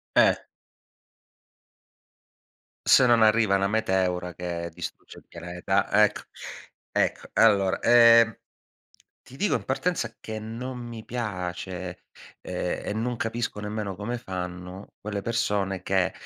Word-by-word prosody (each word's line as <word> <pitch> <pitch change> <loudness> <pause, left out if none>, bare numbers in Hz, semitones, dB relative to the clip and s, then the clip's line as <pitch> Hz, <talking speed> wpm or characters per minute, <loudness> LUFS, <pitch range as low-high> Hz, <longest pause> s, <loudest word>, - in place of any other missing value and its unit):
Eh. - - +6 2.5
Se 125 - +7
non 120 -2 +5
arriva 110 -2 +4
una 100 0 +2
meteora 95 -5 0
che 85 -1 -4
distrugge - - -8
il - - -17
pianeta. 85 +1 -2 0.2
Ecco - - -1 0.7
ecco. - - 0
Allora, 100 -4 +4
ehm, 115 -2 +6 0.9
ti 130 - -14
dico 205 - +1
in 110 - -2
partenza 130 - -1
che 110 0 -6
non 115 +4 -6
mi 120 -2 -8
piace, 90 -5 -5 0.4
ehm, - - -3
e - - -2
non 120 +3 -2
capisco 115 -1 -3
nemmeno 105 -2 -4
come 120 +4 -4
fanno 90 -1 -6
quelle 105 -1 -4
persone 100 -4 -1
che 95 -1 +1
105 Hz, 120 wpm, -26 LUFS, 95-115 Hz, 2.5 s, Se